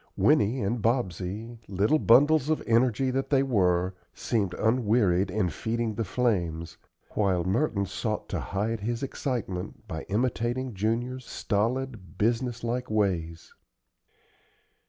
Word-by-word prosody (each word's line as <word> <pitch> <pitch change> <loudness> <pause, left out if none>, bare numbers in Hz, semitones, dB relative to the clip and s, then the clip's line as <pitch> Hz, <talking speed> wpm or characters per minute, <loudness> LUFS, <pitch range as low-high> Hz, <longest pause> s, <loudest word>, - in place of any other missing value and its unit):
Winnie 110 +6 +3
and 110 +4 -1
Bobsey, 110 0 -2
little 100 +10 +2
bundles 145 +4 +5
of 155 - +1
energy 120 +2 +2
that 135 +1 -1
they 135 -2 +4
were, 90 -7 +2 0.2
seemed 100 -6 -1
unwearied 110 -5 +2
in 105 -4 0
feeding 115 +6 -2
the 115 - -2
flames, 85 -9 -1 0.4
while 95 -4 +1
Merton 100 - +1
sought - - -3
to - - -2
hide 105 +3 -2
his 115 +4 -3
excitement 110 -8 -4
by 80 -5 -4
imitating 120 +3 -1
Junior's 120 +5 -2
stolid, 110 - -2
business 115 +2 0
like 125 +2 -2
ways. 90 -6 -1
110 Hz, 120 wpm, -27 LUFS, 95-125 Hz, 0.4 s, bundles